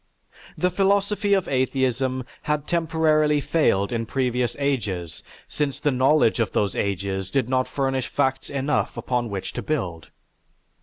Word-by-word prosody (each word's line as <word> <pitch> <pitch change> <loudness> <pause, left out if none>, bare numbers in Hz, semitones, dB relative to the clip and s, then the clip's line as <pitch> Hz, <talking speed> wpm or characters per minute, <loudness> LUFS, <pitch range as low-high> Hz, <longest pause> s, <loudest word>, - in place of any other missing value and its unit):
The 180 0 +1
philosophy 200 +2 +2
of 190 - 0
atheism 130 -1 0 0.2
had 150 -1 -1
temporarily 155 -3 +2
failed 135 -10 +1
in 115 -1 -2
previous 125 -2 0
ages, 110 - -2 0.3
since 140 -2 -2
the 145 0 +1
knowledge 130 -2 +3
of 115 - 0
those 100 -2 0
ages 95 -1 -2
did 135 -4 0
not 130 0 +1
furnish 135 -2 -1
facts 135 0 -1
enough 140 +1 -1
upon 120 -2 -1
which 100 -2 -5
to - - -4
build. 90 - -3
130 Hz, 140 wpm, -24 LUFS, 115-150 Hz, 0.3 s, knowledge